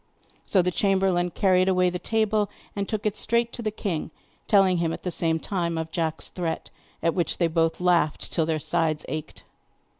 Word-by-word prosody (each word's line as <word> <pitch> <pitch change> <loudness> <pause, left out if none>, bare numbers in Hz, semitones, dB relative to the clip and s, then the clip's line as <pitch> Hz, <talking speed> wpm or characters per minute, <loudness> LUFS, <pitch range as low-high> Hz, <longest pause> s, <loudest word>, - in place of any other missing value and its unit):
So 190 -3 +3
the 180 - +1
chamberlain 190 -2 +2
carried 185 +1 +3
away 180 -1 +3
the 180 - -4
table 215 +1 +1 0.3
and 200 -1 -2
took 215 -1 -3
it 210 -1 +1
straight 235 0 +1
to - - -5
the 220 - 0
king, 200 -6 -3 0.4
telling 195 -3 +4
him 170 -1 0
at - - -7
the 180 - -2
same 165 -1 +1
time 170 -1 -2
of 160 0 -4
Jack's 160 -2 -2
threat, 170 -3 -4 0.3
at 165 -1 +2
which 175 -3 -1
they 175 - +2
both 165 0 +1
laughed 175 -4 +1
till 160 -2 +1
their 160 -1 +1
sides 155 0 0
ached. 155 0 -6
180 Hz, 190 wpm, -25 LUFS, 165-195 Hz, 0.4 s, telling